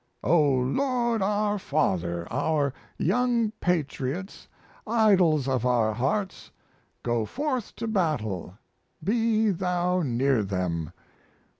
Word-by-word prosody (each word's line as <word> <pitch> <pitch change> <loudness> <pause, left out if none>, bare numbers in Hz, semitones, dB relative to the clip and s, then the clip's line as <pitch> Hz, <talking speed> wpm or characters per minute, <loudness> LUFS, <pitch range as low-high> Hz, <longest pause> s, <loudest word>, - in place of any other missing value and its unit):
"O 170 0 +4
Lord 235 - 0
our 205 +1 +1
Father, 85 - -1
our 145 -4 +1 0.2
young 235 +3 +1
patriots, 165 +1 -2 0.4
idols 190 - +3
of 130 -3 0
our 120 -3 +2
hearts, 150 - -2 0.5
go 120 -2 0
forth 260 - -3
to 230 - -4
battle 110 - -1 0.5
be 220 0 +2
Thou 180 0 0
near 130 -3 +1
them! 90 -4 -2
165 Hz, 100 wpm, -26 LUFS, -, 0.5 s, O